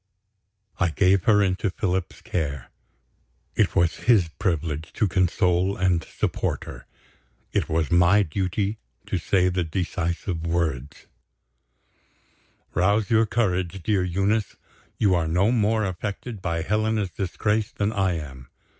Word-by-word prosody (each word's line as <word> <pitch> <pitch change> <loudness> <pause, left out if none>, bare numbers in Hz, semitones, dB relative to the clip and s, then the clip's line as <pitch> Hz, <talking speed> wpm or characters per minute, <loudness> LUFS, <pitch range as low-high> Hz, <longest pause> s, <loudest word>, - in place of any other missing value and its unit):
I 90 - +3
gave 95 +2 +2
her 105 -2 +5
into 95 +1 0
Philip's 95 -1 -2
care. 70 -7 -3 0.8
It - - +1
was 85 -1 +2
his 100 -9 +5
privilege 80 -4 -2
to 105 - +1
console 90 +1 +1
and 90 -3 +1
support - - -2
her. - - -10 0.6
It - - 0
was 80 +1 0
my 90 +4 +5
duty 95 +5 -2 0.3
to 95 - -2
say 90 +2 +2
the 90 0 0
decisive 85 0 -3
words: 80 -5 -2 1.7
"Rouse 100 +3 +2
your 110 0 +4
courage, 95 -5 -1
dear 100 -2 +1
Eunice; 100 +4 0 0.4
you 100 -4 +3
are 85 -2 +1
no 90 +7 +2
more 110 -2 +2
affected 100 +3 -5
by 85 -2 -2
Helena's 105 0 0
disgrace 105 +4 -1
than 105 +2 -1
I 95 -3 +1
am. 65 -6 -7
95 Hz, 130 wpm, -24 LUFS, 85-105 Hz, 1.7 s, her